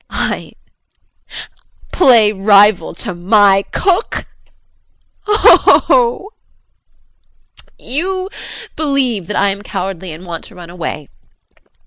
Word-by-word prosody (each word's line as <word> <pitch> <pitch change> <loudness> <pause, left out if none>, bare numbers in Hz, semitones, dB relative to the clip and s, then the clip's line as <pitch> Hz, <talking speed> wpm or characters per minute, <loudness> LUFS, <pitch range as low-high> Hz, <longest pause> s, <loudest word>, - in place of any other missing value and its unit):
I - - -4 1.4
play 235 -10 +4
rival 200 -3 +3
to 200 +2 -6
my 195 +2 +3
cook 375 -1 -1 1.0
oh 420 +1 +5 0.2
oh - - +6
oh! 470 -5 +1 1.5
You 370 +7 -3 0.5
believe 265 - -2
that 210 - -4
I 200 - +2
am 200 +1 -5
cowardly 190 -3 -6
and 165 +4 -11
want 170 -2 -7
to 220 - -15
run 175 -1 -12
away. 160 -4 -6
205 Hz, 100 wpm, -14 LUFS, 180-275 Hz, 1.5 s, oh